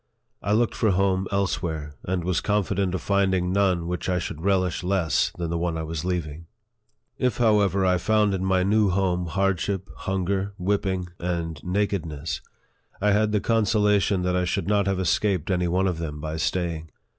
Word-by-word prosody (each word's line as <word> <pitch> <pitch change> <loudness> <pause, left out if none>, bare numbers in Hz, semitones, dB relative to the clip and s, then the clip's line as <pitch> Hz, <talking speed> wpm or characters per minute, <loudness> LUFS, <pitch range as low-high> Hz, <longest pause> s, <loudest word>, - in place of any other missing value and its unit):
I 100 - 0
looked 115 +1 +2
for 110 - +1
home 95 0 +1
else 100 -3 0
where, 80 -4 -4
and 90 -1 -2
was 90 -1 0
confident 100 -2 0
of - - -4
finding 95 -2 +1
none 95 -4 +2
which 90 +2 -3
I 90 - +1
should 80 -2 -4
relish 95 -1 +1
less 90 -6 +1
than 85 -1 -3
the 85 - -1
one 85 -1 -1
which 80 - -2
I - - -4
was 80 -1 -4
leaving. 85 -3 -3 0.7
If, 125 -4 +1
however, 105 -4 +3
I 90 -1 +3
found 105 -1 +2
in 95 -1 -2
my 95 -1 +2
new 105 +1 +3
home 90 -2 0
hardship, 95 +2 0
hun 95 -1 -2
ger, 100 +1 -1
whipping, 95 -1 -1
and 85 -3 -3
nakedness, 85 -7 -2 0.6
I 105 +1 +2
had 105 +1 +2
the 105 - +2
consolation 105 -4 +2
that 90 0 0
I 90 - +1
should 90 - -1
not 100 -1 +2
have 95 -1 0
escaped 95 0 +1
any 90 -1 +1
one 90 +3 +1
of 90 -4 -1
them 75 -3 -4
by 80 +1 -4
staying. 80 -2 -2
95 Hz, 190 wpm, -25 LUFS, 85-100 Hz, 0.7 s, however